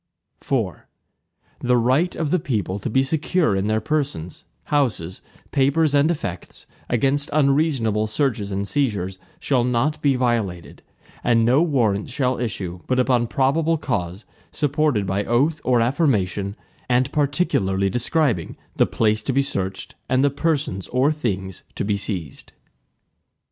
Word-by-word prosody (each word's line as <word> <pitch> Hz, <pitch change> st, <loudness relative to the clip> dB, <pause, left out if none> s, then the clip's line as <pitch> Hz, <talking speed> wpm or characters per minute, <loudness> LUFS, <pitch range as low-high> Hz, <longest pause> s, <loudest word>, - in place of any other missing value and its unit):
IV -, -, -1 dB, 0.8 s
The 125 Hz, 0 st, +2 dB
right 130 Hz, +9 st, +2 dB
of 155 Hz, -3 st, -2 dB
the 180 Hz, -, +3 dB
people 105 Hz, -9 st, -2 dB
to 115 Hz, -, -4 dB
be 130 Hz, +4 st, +3 dB
secure 155 Hz, -, +1 dB
in 95 Hz, +1 st, 0 dB
their 110 Hz, 0 st, +1 dB
persons, 135 Hz, -, -3 dB, 0.2 s
houses, 110 Hz, -, -1 dB, 0.3 s
papers, 145 Hz, +2 st, +2 dB
and 145 Hz, +2 st, +4 dB
effects, 100 Hz, -, -5 dB, 0.2 s
against 135 Hz, +4 st, +1 dB
unreasonable 135 Hz, -7 st, +2 dB
searches 110 Hz, -3 st, -1 dB
and 100 Hz, +1 st, -2 dB
seizures, 100 Hz, -9 st, -1 dB, 0.2 s
shall 130 Hz, -4 st, +1 dB
not 125 Hz, +5 st, 0 dB
be 140 Hz, -2 st, +3 dB
violated, 115 Hz, -9 st, -2 dB, 0.4 s
and 115 Hz, -1 st, +3 dB
no 130 Hz, +6 st, +4 dB
Warrants 120 Hz, -, +1 dB
shall 130 Hz, -1 st, 0 dB
issue, 95 Hz, -7 st, -4 dB
but 130 Hz, -, +1 dB
upon 125 Hz, -2 st, +2 dB
probable 155 Hz, +7 st, +1 dB
cause, 100 Hz, -, -3 dB, 0.3 s
supported 145 Hz, -, +1 dB
by 95 Hz, +2 st, -1 dB
oath 145 Hz, +8 st, +1 dB
or 125 Hz, -2 st, +3 dB
affirmation, 105 Hz, -, 0 dB, 0.3 s
and 125 Hz, +2 st, +2 dB
particularly 140 Hz, -, +1 dB
describing 120 Hz, -, 0 dB, 0.2 s
the -, -, +4 dB
place 110 Hz, -1 st, +1 dB
to 130 Hz, -, -2 dB
be 140 Hz, +2 st, +3 dB
searched, 95 Hz, -8 st, -4 dB, 0.2 s
and 130 Hz, +1 st, +3 dB
the 140 Hz, -, +3 dB
persons 140 Hz, -, -1 dB
or 130 Hz, +4 st, +2 dB
things 95 Hz, -, -3 dB
to -, -, -2 dB
be 105 Hz, 0 st, +1 dB
seized. 90 Hz, -, -5 dB
125 Hz, 140 wpm, -22 LUFS, 100-145 Hz, 0.8 s, and